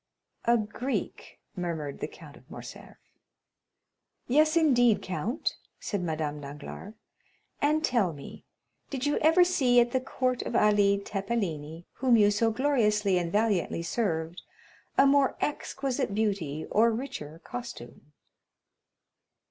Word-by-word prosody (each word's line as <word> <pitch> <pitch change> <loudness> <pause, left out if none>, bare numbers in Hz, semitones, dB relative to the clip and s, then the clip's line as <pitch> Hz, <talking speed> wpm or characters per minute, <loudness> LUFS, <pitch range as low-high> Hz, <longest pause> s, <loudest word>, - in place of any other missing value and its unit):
"A 235 0 +4
Greek?" 225 +5 -4 0.2
murmured 165 -6 -4
the - - -3
Count - - -14
of - - -19
Morcerf. - - -10 1.3
"Yes, 310 +5 +4
indeed, 245 -8 +4
count," 220 - -2 0.2
said 205 -3 -3
Madame 155 -3 -3
Danglars; 150 +9 -9 0.7
"and 305 +2 +2
tell 225 -8 +1
me, 145 -3 -11 0.5
did 270 -1 -3
you 290 - +1
ever 325 +4 +5
see 265 -9 +3
at 240 0 +3
the 260 - +1
court 255 -1 -1
of - - -4
Ali 205 -2 +4
Tepelini, 195 -6 -3
whom 255 -3 +4
you 205 -1 +5
so 225 +2 +2
gloriously 215 -7 +2
and 170 -1 -3
valiantly 205 -5 +1
served, 170 -3 -2 0.6
a 275 - +7
more 275 -1 +4
exquisite 270 -7 -2
beauty 190 -9 -1
or 225 +3 +4
richer 220 - -5
costume?" 150 - -9
215 Hz, 125 wpm, -28 LUFS, 175-255 Hz, 1.3 s, a